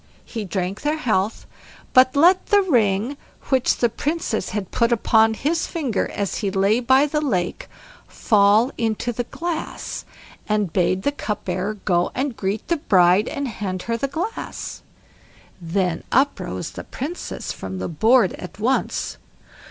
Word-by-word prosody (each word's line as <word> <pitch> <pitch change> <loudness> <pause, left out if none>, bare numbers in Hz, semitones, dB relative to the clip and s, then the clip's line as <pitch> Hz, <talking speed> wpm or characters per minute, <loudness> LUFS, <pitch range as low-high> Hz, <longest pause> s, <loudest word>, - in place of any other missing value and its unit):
He 225 -3 -5
drank 190 +1 -3
their 300 +2 0
health, 215 -7 0 0.5
but 255 +1 +6
let 355 +6 +5
the 410 -1 +4
ring 235 - +1 0.3
which 260 -2 +2
the 240 - +3
Princess 280 - -2
had 200 -2 -4
put 235 0 +2
upon 225 -1 +3
his 320 +8 0
finger 270 - -1
as 200 -2 -2
he 200 - -1
lay 195 +4 +2
by 260 +3 +4
the 300 +1 -1
lake 185 -12 -1 0.4
fall 210 +3 +3
into 230 +1 -1
the 245 +2 -3
glass, 335 +4 -4 0.5
and 210 -5 0
bade 185 +1 +1
the 285 - +2
cupbearer 210 -5 -3
go 175 -2 +2
and 265 -1 -1
greet 200 +1 -3
the 340 - +1
bride 185 -5 +4
and 280 -1 -3
hand 190 -5 -4
her 230 - -1
the 255 +4 -1
glass. 340 +11 -5 0.8
Then 175 0 -1
up 275 +3 +3
rose - - -5
the - - -8
Princess 315 +7 -5
from 95 0 -6
the 95 - -3
board 220 - +3
at 180 - -9
once. 240 +6 -1
225 Hz, 150 wpm, -22 LUFS, 195-275 Hz, 0.8 s, but